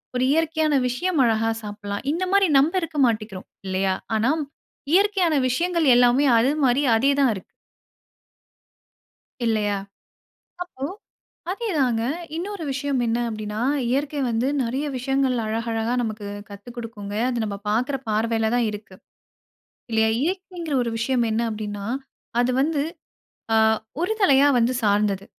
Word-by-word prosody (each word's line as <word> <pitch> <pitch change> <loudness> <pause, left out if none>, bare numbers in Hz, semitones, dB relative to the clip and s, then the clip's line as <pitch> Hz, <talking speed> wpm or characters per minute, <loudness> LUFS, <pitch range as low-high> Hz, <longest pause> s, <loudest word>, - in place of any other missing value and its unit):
ஒரு 250 - +1
இயற்கையான 315 -1 +1
விஷயம் 325 +6 -1
அழகா 225 -1 +2
சாப்பிடலாம். 205 0 -6
இந்த 345 +4 -1
மாரி 395 -2 +4
நம்ப 305 +6 +2
இருக்க 325 -2 -5
மாட்டிக்கிறோம். 215 -5 -2 0.2
இல்லையா, 190 0 +1 0.2
ஆனா 280 +8 +1 0.5
இயற்கையான 385 -5 +3
விஷயங்கள் 335 +4 +1
எல்லாமே 245 +3 +4
அது 245 +4 +3
மாரி 255 +2 +3 0.2
அதே 275 +4 +3
தான் 265 -4 +4
இருக்கு. 190 - -8 2.0
இல்லையா? 210 -3 +1 0.9
அப்போ 275 -7 -11 0.7
அதே 445 +4 -3
தாங்க. 240 -4 +2 0.3
இன்னொரு 385 +1 -4
விஷயம் 270 0 -1
என்ன 230 +1 0
அப்படின்னா, 215 0 -4 0.3
இயற்கை 285 +2 -1
வந்து 230 +3 0 0.2
நெறைய 260 +5 -2
விஷயங்கள் 265 0 0
அழகழகா 225 +1 -2
நமக்கு 215 -2 -4 0.2
கத்து 205 +4 -10
குடுக்குங்க. 210 -3 -7
அது 240 -2 -1
நம்ப 200 -2 -4
பாக்குற 250 +6 +1
பார்வைல 220 +1 +1
தான் 240 -2 +2
இருக்கு. 210 -2 -9 0.9
இல்லையா? 220 0 +3
இயற்கைங்கிற 350 -3 -3
ஒரு 235 - -2
விஷயம் 240 0 +1
என்ன 225 +2 0
அப்டின்னா, 205 -2 -5 0.6
அது 250 - +1
வந்து 290 0 +1 0.7
ஆ - - +4 0.5
ஒரு 365 - 0
தலையா 280 -6 +5
வந்து 240 +2 +2
சார்ந்தது. 200 -1 +1
245 Hz, 130 wpm, -23 LUFS, 220-290 Hz, 2.0 s, தலையா